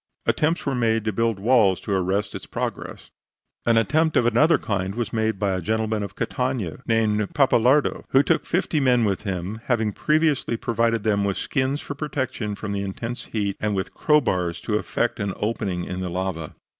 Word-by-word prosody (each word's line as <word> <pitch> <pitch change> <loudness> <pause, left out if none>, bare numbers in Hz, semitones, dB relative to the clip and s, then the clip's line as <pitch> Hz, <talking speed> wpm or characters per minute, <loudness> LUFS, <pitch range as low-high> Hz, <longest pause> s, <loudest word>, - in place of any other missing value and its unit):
Attempts 160 +3 +1
were 140 - 0
made 115 -3 +1
to 110 - 0
build 115 +1 +1
walls 105 -3 +3
to 100 - -3
arrest 95 +2 0
its - - -7
progress. - - -5 0.6
An 115 -1 +4
attempt 155 +9 +2
of 120 - +3
another 145 +7 +4
kind 95 -1 -2
was 120 -1 -3
made 110 -2 0
by 100 0 0
a 95 -1 -1
gentleman 110 +2 -1
of 100 -1 -6
Catania, 125 - -2
named 105 -3 +1
Pappalardo, 135 0 +3
who 135 +1 +5
took - - +1
fifty 170 -3 0
men 125 -4 +3
with 100 -2 0
him, 95 +2 -4
having 110 -4 +1
previously 150 -5 +1
provided 115 -1 0
them 100 -2 +2
with 100 -1 -1
skins 135 +1 -1
for - - -6
protection 130 -7 -3
from 105 0 -5
the 100 -1 -2
intense 115 +5 -5
heat 100 -3 -2
and 105 -1 -1
with 95 - -3
crowbars 90 - +1
to 110 - -3
effect 115 +2 -1
an 100 -2 -2
opening 100 -5 -2
in 90 +1 -5
the 90 - -3
lava. 85 -3 -4
110 Hz, 185 wpm, -24 LUFS, 100-125 Hz, 0.6 s, who